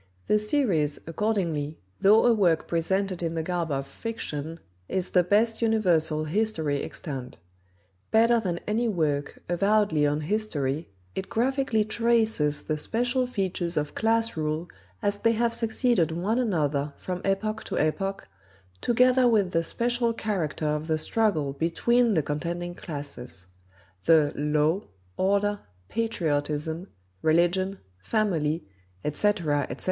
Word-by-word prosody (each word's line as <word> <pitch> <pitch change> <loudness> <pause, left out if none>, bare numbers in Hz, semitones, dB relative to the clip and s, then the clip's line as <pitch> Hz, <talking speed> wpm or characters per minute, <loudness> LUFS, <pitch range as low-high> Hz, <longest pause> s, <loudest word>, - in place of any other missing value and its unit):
The 210 - +3
series, 210 - +1
accordingly, 165 -5 -1 0.2
though 215 +3 +6
a 240 - +6
work 175 -7 +2
presented 185 +2 0
in 165 -1 -2
the 160 - -1
garb 175 -1 -2
of 135 -1 -1
"fiction," 165 -3 -5 0.3
is 185 -1 -1
the 180 - +5
best 215 +6 +2
universal 175 -9 +2
history 160 -5 0
extant: 135 -5 -6 0.7
Better 230 +1 +4
than 180 -5 -2
any 230 +3 0
work, 150 -8 -1
avowedly 185 -4 +2
on 145 +1 0
history, 155 -6 -1 0.2
it 190 - -5
graphically 250 -2 +1
traces 220 -9 +1
the 155 -1 -2
special 245 - 0
features 185 -7 -2
of 150 0 -1
class 225 +1 +1
rule 155 +2 -2 0.4
as 205 0 +1
they 230 +2 +2
have 230 +1 +1
succeeded 230 - +2
one 195 +9 0
another 150 - 0
from 180 -1 -5
epoch 215 +3 -1
to - - -3
epoch, 195 +6 -1 0.5
together 250 +1 +4
with 210 -6 +3
the 165 - +2
special 235 +6 0
character 190 -9 -2
of 150 +1 -1
the 160 -1 +1
struggle 155 -6 +1
between 225 - +2
the 160 - +2
contending 170 +4 -3
classes. 140 - -7 0.6
The 155 -3 +5
"Law," 150 +5 +1 0.3
"Order," 200 +2 +1 0.3
"Patriotism," 160 -6 -1 0.3
"Religion," 175 +4 +2 0.2
"Family," 170 - 0 0.4
etc., 150 -3 +1
etc. 125 - -6
180 Hz, 130 wpm, -26 LUFS, 155-220 Hz, 0.7 s, though